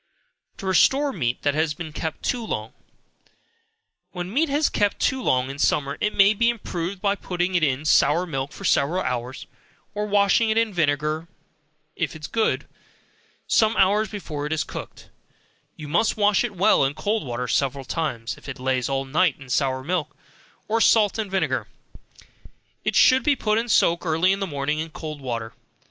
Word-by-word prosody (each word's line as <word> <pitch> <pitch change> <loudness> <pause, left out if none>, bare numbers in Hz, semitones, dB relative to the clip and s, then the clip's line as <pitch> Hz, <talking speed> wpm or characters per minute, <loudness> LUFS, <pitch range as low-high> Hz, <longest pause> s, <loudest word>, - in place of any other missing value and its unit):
To 195 - -8
Restore 270 - +3
Meat 125 -8 -2
that 145 - +2
has 155 0 0
been 160 -1 -7
kept 160 0 -5
too 245 -2 -1
long. 110 - -4 1.4
When 180 +2 -5
meat 310 +4 +2
has 290 +2 +2
been - - -4
kept 205 -1 +1
too 260 0 0
long 130 - +1
in 140 - -10
summer, 140 -1 0
it 210 - 0
may 200 +1 +6
be 230 +3 +2
improved 185 -4 -4
by 200 -1 +3
putting 180 -2 -3
it 175 - +2
in 140 0 0
sour 155 +3 +4
milk 135 -4 -4
for - - -9
several 175 +7 +2
hours, 125 +1 -4 0.5
or 210 0 -2
washing 205 +2 +3
it 220 - +1
in 225 -2 +1
vinegar 155 0 0 0.7
is 160 -3 -2
good, 225 +5 0 0.8
some 220 0 +2
hours 205 +2 +3
before 155 -8 -5
it 155 - -2
is 160 - 0
cooked, - - -9 0.6
you 155 - -9
must 170 +11 +1
wash 205 0 +3
it 235 -4 -4
well 195 -3 +4
in 135 +1 0
cold 215 +4 -1
water 125 -1 -4
several 135 +3 -1
times, 130 -7 -3
if - - -11
it 135 - -6
lays 130 -1 -1
all 135 0 -1
night 155 +3 +2
in 135 -2 -13
sour 130 0 0
milk, 155 -2 -3 0.5
or 225 +1 +1
salt 215 -1 +4
and 210 -2 -2
vinegar, 190 0 -1 1.2
it - - -1
should 260 +1 +6
be 290 +2 +2
put 215 -3 +1
in 235 +1 -4
soak 170 -4 +3
early 165 +3 +2
in 195 - 0
the 195 - -2
morning 145 0 -2
in 160 +1 -4
cold 155 -2 -7
water. 115 -3 -4
170 Hz, 185 wpm, -23 LUFS, 140-205 Hz, 1.4 s, may